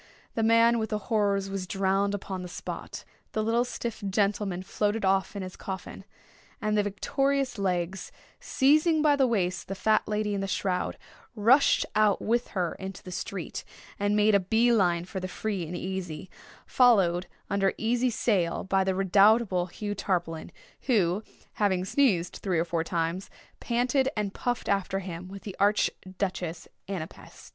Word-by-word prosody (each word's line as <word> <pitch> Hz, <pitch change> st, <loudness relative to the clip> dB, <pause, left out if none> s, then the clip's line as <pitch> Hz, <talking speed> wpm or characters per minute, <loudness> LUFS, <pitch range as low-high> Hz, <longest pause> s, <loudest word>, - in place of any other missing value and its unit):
The 225 Hz, -, -1 dB
man 230 Hz, +1 st, +5 dB
with 220 Hz, -1 st, -2 dB
the 215 Hz, -, 0 dB
horrors 205 Hz, -2 st, 0 dB
was 195 Hz, -1 st, -4 dB
drowned 195 Hz, +1 st, +1 dB
upon 190 Hz, -2 st, -5 dB
the 180 Hz, -, -6 dB
spot—the 215 Hz, +4 st, -6 dB
little 230 Hz, +2 st, +2 dB
stiff 235 Hz, -3 st, -5 dB
gentleman 200 Hz, -2 st, 0 dB
floated 210 Hz, +2 st, -1 dB
off 190 Hz, +1 st, +1 dB
in 200 Hz, -, -4 dB
his 185 Hz, 0 st, -7 dB
coffin—and 205 Hz, +2 st, -7 dB
the 210 Hz, -, +4 dB
victorious 270 Hz, +5 st, -1 dB
Legs, 185 Hz, -1 st, -2 dB, 0.3 s
seizing 305 Hz, +3 st, +3 dB
by 295 Hz, -2 st, +5 dB
the 270 Hz, -2 st, +3 dB
waist 185 Hz, -6 st, -1 dB
the 195 Hz, -, -4 dB
fat 215 Hz, +3 st, +2 dB
lady 210 Hz, 0 st, -1 dB
in 200 Hz, -, -1 dB
the 195 Hz, -, -2 dB
shroud, 185 Hz, -1 st, -1 dB, 0.4 s
rushed 240 Hz, +7 st, +4 dB
out 215 Hz, -1 st, +3 dB
with 235 Hz, +2 st, 0 dB
her 175 Hz, -2 st, 0 dB
into 190 Hz, -1 st, -7 dB
the 185 Hz, -, -9 dB
street, 185 Hz, 0 st, -5 dB, 0.4 s
and 205 Hz, +1 st, +1 dB
made 210 Hz, 0 st, +4 dB
a 200 Hz, -, +6 dB
bee 225 Hz, +6 st, +2 dB
line 175 Hz, -5 st, +2 dB
for 190 Hz, +1 st, -5 dB
the 185 Hz, -, -4 dB
Free 190 Hz, -3 st, -3 dB
and 175 Hz, +2 st, -5 dB
Easy, 185 Hz, -2 st, -5 dB, 0.3 s
followed 190 Hz, -8 st, +4 dB, 0.2 s
under 195 Hz, -1 st, +1 dB
easy 240 Hz, +3 st, +1 dB
sail 195 Hz, -7 st, 0 dB
by 190 Hz, 0 st, +2 dB
the 190 Hz, 0 st, 0 dB
redoubtable 195 Hz, 0 st, +4 dB
Hugh 205 Hz, +4 st, -5 dB
Tarpaulin, 175 Hz, -5 st, -2 dB, 0.4 s
who, 200 Hz, -6 st, +2 dB, 0.3 s
having 190 Hz, -3 st, +1 dB
sneezed 190 Hz, -7 st, +1 dB
three 185 Hz, -4 st, -1 dB
or 165 Hz, -, +1 dB
four 165 Hz, -1 st, -1 dB
times, 170 Hz, +2 st, -2 dB, 0.3 s
panted 250 Hz, +3 st, +1 dB
and 205 Hz, -2 st, -1 dB
puffed 245 Hz, -1 st, -2 dB
after 195 Hz, -1 st, 0 dB
him 180 Hz, -2 st, -6 dB
with 195 Hz, +1 st, -10 dB
the 200 Hz, -3 st, -7 dB
Arch 205 Hz, +2 st, +3 dB, 0.3 s
Duchess 175 Hz, -4 st, -3 dB, 0.2 s
Ana 185 Hz, -5 st, -2 dB
Pest. -, -, -15 dB
195 Hz, 165 wpm, -28 LUFS, 185-220 Hz, 0.4 s, a